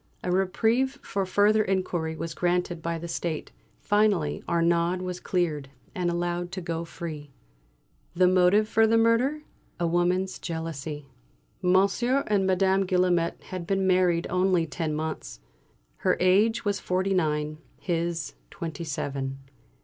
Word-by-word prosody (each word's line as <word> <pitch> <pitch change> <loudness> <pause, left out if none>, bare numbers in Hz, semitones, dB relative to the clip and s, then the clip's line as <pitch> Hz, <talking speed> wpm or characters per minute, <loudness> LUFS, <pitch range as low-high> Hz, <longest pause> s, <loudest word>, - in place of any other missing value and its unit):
A 180 - -1
reprieve 225 +8 +1
for 195 -1 -2
further 210 +3 +4
inquiry 180 -5 -1
was 165 0 -5
granted 175 -1 0
by 170 +1 -2
the 170 +1 -6
State. 165 -1 -3 0.3
Finally 205 -8 +1
Arnaud 170 +2 +2
was 180 -1 -4
cleared, 155 -8 -1 0.2
and 180 -1 -1
allowed 175 0 -2
to 190 - -3
go 170 -2 -3
free. 155 -3 -7 0.9
The 180 +1 +5
motive 185 +4 +4
for 225 0 +4
the 225 +1 +3
murder? 240 +7 +2 0.4
A 175 - +1
woman's 175 +2 +1
jealousy. 160 -3 -5 0.6
Monsieur 200 +9 +2
and 200 -2 +1
Madame 190 +1 +3
Guillaumet 180 -2 +1
had 180 -2 -5
been 195 -1 +1
married 180 -2 +3
only 180 -2 +2
ten 155 +1 -3
months. 150 - -5 0.6
Her - - +1
age 205 +6 +3
was 205 -1 0
forty 190 +2 0
nine; 155 -3 0 0.2
his 170 -3 -2 0.2
twenty 165 -1 -6
seven. 135 -3 -3
180 Hz, 135 wpm, -26 LUFS, 165-190 Hz, 0.9 s, The